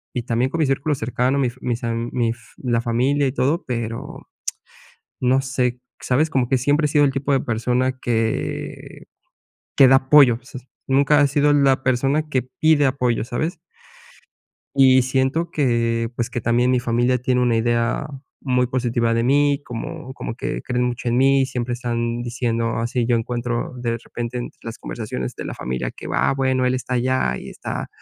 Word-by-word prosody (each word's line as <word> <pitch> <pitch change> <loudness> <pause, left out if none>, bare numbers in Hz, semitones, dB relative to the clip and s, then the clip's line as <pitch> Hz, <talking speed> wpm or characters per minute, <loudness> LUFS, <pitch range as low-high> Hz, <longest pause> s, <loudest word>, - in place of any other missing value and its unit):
y 120 - -1
también 120 +2 0
con 165 - -2
mis 150 - +2
círculos 140 +2 0
cercanos, 125 +4 0
mi 130 - +2
fa 130 - -21
mis 120 -1 -2
am 115 0 -2
mi 120 -2 +1
f 120 - -8 0.2
la 120 -3 0
familia 130 +5 +1
y 130 - -1
todo, 145 +6 0
pero 115 -2 -5 0.9
no 130 +1 +3
sé, 125 -2 -1 0.2
¿sabes?, 145 +6 +1
como 130 -5 +1
que 130 - +3
siempre 145 +4 +2
he - - -1
sido 145 0 +4
el - - +2
tipo 135 +1 -1
de 135 - +3
persona 125 +3 -1
que 115 -2 -3 0.7
que 135 - +8
da 135 - +7
apoyo, 130 -3 +5
o 125 - -27
sea, 130 -2 -9 0.3
nunca 140 +2 +4
he 145 - +5
sido 145 +1 +3
la 135 -2 +3
persona 135 +5 +1
que 130 -4 0 0.2
pide 155 -2 +4
apoyo, 125 -4 0
¿sabes? 155 +8 -3 1.2
Y 130 -1 +6
siento 135 +6 0
que, 115 -7 0
pues, 120 0 -1
que 120 - -3
también 120 +3 +2
mi 125 - +2
familia 120 +2 +1
tiene 125 +1 +1
una 120 -2 +2
idea 120 +4 0 0.3
muy 125 -2 +1
positiva 120 -2 0
de 115 0 +1
mí 140 +2 +3
como 120 +2 -6
como 115 - -5
que - - -4
creen 125 -1 -1
mucho 125 0 -2
en 120 - +1
mí 135 +1 +4
y 135 - +2
siempre 125 -2 -3
están 120 -1 -2
diciendo 115 -1 -1
así 120 +1 -1
yo 120 0 +2
encuentro 120 +1 -2
de 115 -1 -1
repente 120 +1 -6
entre 120 - -7
las 115 -1 -7
conversaciones 105 - -5
de - - -7
la - - -5
familia 65 0 -3
que - - -10
va, - - +1
bueno, 130 -1 +1
él 125 - +2
está 130 0 -3
allá 125 - +1
y - - -9
está - - -5
125 Hz, 190 wpm, -21 LUFS, 120-135 Hz, 1.2 s, que